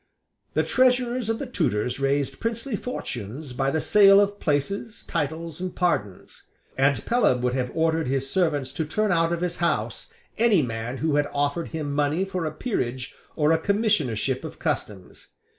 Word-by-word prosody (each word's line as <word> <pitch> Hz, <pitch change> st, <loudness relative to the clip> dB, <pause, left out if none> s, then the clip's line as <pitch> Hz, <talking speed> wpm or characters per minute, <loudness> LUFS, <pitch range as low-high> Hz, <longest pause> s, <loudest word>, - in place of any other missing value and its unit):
The -, -, +3 dB
Treasurers 250 Hz, -2 st, +2 dB
of 225 Hz, -, 0 dB
the 280 Hz, -, -4 dB
Tudors 135 Hz, -, -1 dB
raised 140 Hz, 0 st, 0 dB
princely 230 Hz, +1 st, -2 dB
fortunes 130 Hz, -, -6 dB
by 135 Hz, +2 st, 0 dB
the 160 Hz, -, 0 dB
sale 195 Hz, +3 st, +6 dB
of 205 Hz, 0 st, +1 dB
places, 200 Hz, +9 st, -2 dB
titles, 160 Hz, +1 st, -3 dB
and 185 Hz, -1 st, -4 dB
pardons; 105 Hz, -, -2 dB, 0.3 s
and 135 Hz, +1 st, +2 dB
Pelham 130 Hz, -, +2 dB
would 125 Hz, 0 st, +1 dB
have 125 Hz, -1 st, -1 dB
ordered 160 Hz, -1 st, +1 dB
his 135 Hz, +1 st, -1 dB
servants 150 Hz, -6 st, 0 dB
to 160 Hz, -, -2 dB
turn 215 Hz, +6 st, 0 dB
out 165 Hz, -1 st, +2 dB
of 170 Hz, 0 st, -1 dB
his 175 Hz, -1 st, -2 dB
house 170 Hz, -, -1 dB, 0.3 s
any 220 Hz, -8 st, +4 dB
man 115 Hz, +1 st, -4 dB
who 150 Hz, +1 st, +1 dB
had 145 Hz, 0 st, +1 dB
offered 145 Hz, +4 st, -1 dB
him 150 Hz, -3 st, -4 dB
money 150 Hz, +5 st, +1 dB
for 185 Hz, -3 st, -3 dB
a 155 Hz, -, -2 dB
peerage 130 Hz, -, -3 dB, 0.2 s
or 150 Hz, 0 st, +3 dB
a 165 Hz, -, +3 dB
commissionership 165 Hz, -, 0 dB
of 160 Hz, -, -7 dB
customs. 105 Hz, -, -4 dB
160 Hz, 170 wpm, -25 LUFS, 135-200 Hz, 0.3 s, sale